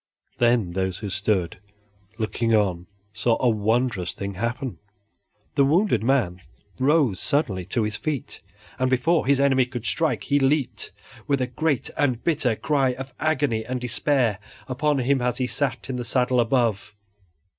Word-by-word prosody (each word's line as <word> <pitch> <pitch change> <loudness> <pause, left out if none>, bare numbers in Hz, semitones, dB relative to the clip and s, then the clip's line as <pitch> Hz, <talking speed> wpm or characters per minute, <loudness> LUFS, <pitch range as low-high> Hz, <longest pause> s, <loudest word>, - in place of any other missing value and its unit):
Then 120 -6 +3
those 95 0 -2
who 105 -3 -5
stood 95 -3 -1 0.6
looking 115 +1 0
on 90 -5 0 0.3
saw 115 +1 +1
a 125 - +2
wondrous 110 -3 0
thing 100 0 -5
happen: 120 +5 -3 0.7
the 140 - +3
wounded 165 - +2
man 115 -9 +1 0.4
rose 135 - +3
suddenly 105 - 0
to 110 +5 0
his 105 0 -2
feet, 150 -5 -4 0.4
and 130 0 +2
before 130 +5 +2
his 140 -1 +4
enemy 135 -2 +3
could 120 -3 -6
strike 160 -2 0
he 145 0 +2
leaped, 135 0 0 0.4
with 140 -2 +1
a 130 - +1
great 135 +1 -1
and 130 -5 0
bitter 135 -8 +1
cry 135 0 +1
of 130 0 -8
agony 145 -8 0
and 125 +3 -3
despair, 125 -3 +1 0.3
upon 145 +3 0
him 135 +1 +1
as 125 0 0
he 130 - 0
sat 130 +2 -1
in 130 -1 -3
the 120 - -3
saddle 125 +1 +1
above. 115 -4 0
125 Hz, 155 wpm, -24 LUFS, 110-140 Hz, 0.7 s, his